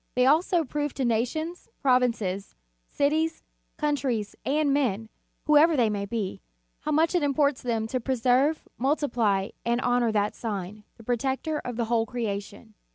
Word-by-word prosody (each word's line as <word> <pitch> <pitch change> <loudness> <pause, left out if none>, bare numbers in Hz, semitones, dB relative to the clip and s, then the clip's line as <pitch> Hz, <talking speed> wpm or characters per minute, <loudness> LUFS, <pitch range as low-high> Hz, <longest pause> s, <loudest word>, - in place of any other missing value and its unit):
They 250 0 +4
also 330 +4 +3
prove 295 0 -3
to 265 - -1
nations, 255 +10 -2
provinces, 235 -7 +1 0.3
cities, 315 +3 0 0.3
countries, 275 -8 -1
and 290 0 +1
men, 225 -6 0 0.4
whoever 305 +1 +5
they 230 -4 +3
may 200 -1 -3
be, 205 -3 -3 0.4
how - - -3
much 320 +3 +3
it 355 - +2
imports 285 -1 +1
them 230 -3 -1
to 255 +3 -2
preserve, 260 +4 +1
multiply, 235 -8 +1
and 235 +1 +1
honor 245 -2 +2
that 210 -1 +1
sign, 210 -1 -5
the 225 - -14
protector 265 +6 -1
of 245 - -6
the 235 0 -1
whole 225 0 +1
creation. 215 -2 -5
250 Hz, 150 wpm, -26 LUFS, 220-290 Hz, 0.4 s, whoever